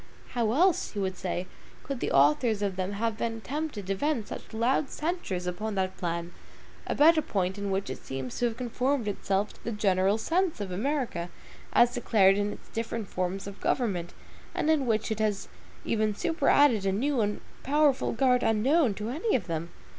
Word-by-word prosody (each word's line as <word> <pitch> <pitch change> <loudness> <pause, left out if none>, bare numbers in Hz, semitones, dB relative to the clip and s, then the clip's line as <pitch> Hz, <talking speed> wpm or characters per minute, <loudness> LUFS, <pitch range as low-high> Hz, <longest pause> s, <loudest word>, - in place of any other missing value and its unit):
How 235 -3 0
else, 350 +5 +2
he 205 - -3
would 190 -1 -1
say, 180 0 -3 0.4
could 275 -3 -4
the - - -2
authors 175 - +3
of 195 -2 -1
them 185 +2 -2
have 220 +1 -2
been 225 -1 -2
tempted 285 -4 -4
to 195 - 0
vent 240 +1 -1
such - - -8
loud 245 +5 +1
censures 300 - -3
upon 210 +4 -3
that 190 -1 -1
plan, 170 0 -3 0.5
about 320 +2 +5
a - - +1
point 190 -5 -2
in 200 0 -2
which 195 0 -1
it - - -6
seems 135 -1 -5
to 245 - +2
have 230 -1 -1
conformed 250 0 -1
itself 200 0 -1
to - - -21
the 235 - -3
general 195 -1 +2
sense 340 - 0
of 200 -2 -4
America 220 - -2 0.4
as 240 0 +5
declared 205 -6 +4
in 205 0 0
its - - -11
different 230 -2 -4
forms 185 +1 -2
of 200 0 -9
government, 185 -9 0 0.4
and 315 - +2
in 285 -5 +2
which 220 -1 0
it 220 - -2
has 210 -2 0 0.4
even 215 -2 +1
superadded 290 - +3
a 195 - +1
new 255 +5 +1
and 205 -1 -1 0.2
powerful 290 -1 +2
guard 250 +1 +3
unknown 235 +2 +3
to 215 +2 -4
any 335 - 0
of 210 - 0
them? 165 -1 -3
215 Hz, 190 wpm, -28 LUFS, 195-260 Hz, 0.5 s, about